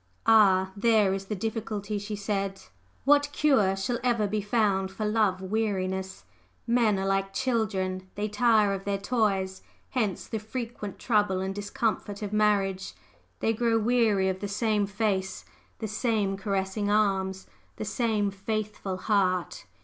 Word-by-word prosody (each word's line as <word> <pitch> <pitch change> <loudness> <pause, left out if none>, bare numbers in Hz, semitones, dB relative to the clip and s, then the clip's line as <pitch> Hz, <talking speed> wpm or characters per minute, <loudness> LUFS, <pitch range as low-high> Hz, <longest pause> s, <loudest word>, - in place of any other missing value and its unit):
"Ah, 190 -4 +5
there 210 -2 +3
is 195 0 -4
the 210 - -3
difficulty!" 210 -1 -3
she 205 +1 -5
said. 195 -1 -2 0.5
"What 290 +1 +4
cure 220 -11 +3
shall 235 +5 -2
ever 235 -4 +2
be 210 +1 -1
found 200 -3 +1
for 195 +3 -4
love 210 -3 +1
weariness? 190 -2 -2 0.4
Men 230 -4 +3
are 190 - -2
all - - -1
like 195 0 0
children 190 -6 -1
they 210 +1 -1
tire 215 -1 +3
of 195 0 -4
their 200 0 -1
toys; 195 -3 0 0.3
hence 215 -8 -1
the 220 - -4
frequent 220 -2 -6
trouble 205 -5 +1
and 190 +1 -2
discomfort 205 0 -2
of 205 0 -4
marriage. 195 - +1 0.5
They 225 - +2
grow 230 0 +2
weary 220 -4 +2
of 190 0 -1
the 205 - -3
same 210 0 0
face, 195 -2 -1 0.3
the 220 - -4
same 215 -2 0
caressing 195 +1 -2
arms, 190 -2 +1 0.3
the - - -5
same 215 -1 0
faithful 205 -1 -3
heart! 185 -3 0
205 Hz, 150 wpm, -27 LUFS, 195-220 Hz, 0.5 s, Ah